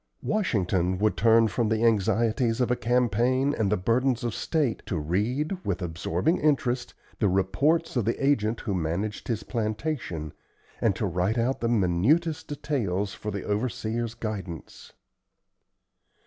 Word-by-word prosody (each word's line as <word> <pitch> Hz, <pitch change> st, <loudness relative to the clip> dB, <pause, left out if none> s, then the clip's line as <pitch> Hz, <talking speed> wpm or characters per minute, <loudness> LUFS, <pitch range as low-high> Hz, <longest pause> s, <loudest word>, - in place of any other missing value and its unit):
Washington 95 Hz, -, 0 dB
would 105 Hz, 0 st, +1 dB
turn 115 Hz, +4 st, +5 dB
from 110 Hz, +3 st, 0 dB
the 110 Hz, +1 st, +1 dB
anxieties 115 Hz, +2 st, +2 dB
of 125 Hz, -1 st, +1 dB
a -, -, +3 dB
campaign 125 Hz, +3 st, +2 dB
and 105 Hz, -3 st, 0 dB
the 105 Hz, -, +3 dB
burdens 120 Hz, +6 st, +1 dB
of 120 Hz, -2 st, -1 dB
state 150 Hz, -8 st, -1 dB
to 90 Hz, -, -1 dB
read, 120 Hz, -, -1 dB
with 95 Hz, -2 st, -1 dB
absorbing 90 Hz, -, -1 dB
interest, 130 Hz, -5 st, 0 dB, 0.2 s
the 105 Hz, -, +3 dB
reports 140 Hz, -, +1 dB
of 120 Hz, -5 st, +1 dB
the 115 Hz, -, 0 dB
agent 120 Hz, -5 st, +1 dB
who 105 Hz, -, -2 dB
managed 90 Hz, +5 st, -2 dB
his 110 Hz, -3 st, -2 dB
plantation, 110 Hz, -, -3 dB, 0.5 s
and 105 Hz, -5 st, +2 dB
to 105 Hz, -, -2 dB
write 90 Hz, +5 st, 0 dB
out 120 Hz, +3 st, 0 dB
the 115 Hz, -, +1 dB
minutest 120 Hz, -, +2 dB
details 105 Hz, -10 st, -2 dB
for 105 Hz, -, -6 dB
the 100 Hz, -2 st, -4 dB
overseer's 115 Hz, +1 st, -2 dB
guidance. 100 Hz, -8 st, -6 dB
110 Hz, 145 wpm, -27 LUFS, 95-125 Hz, 0.5 s, turn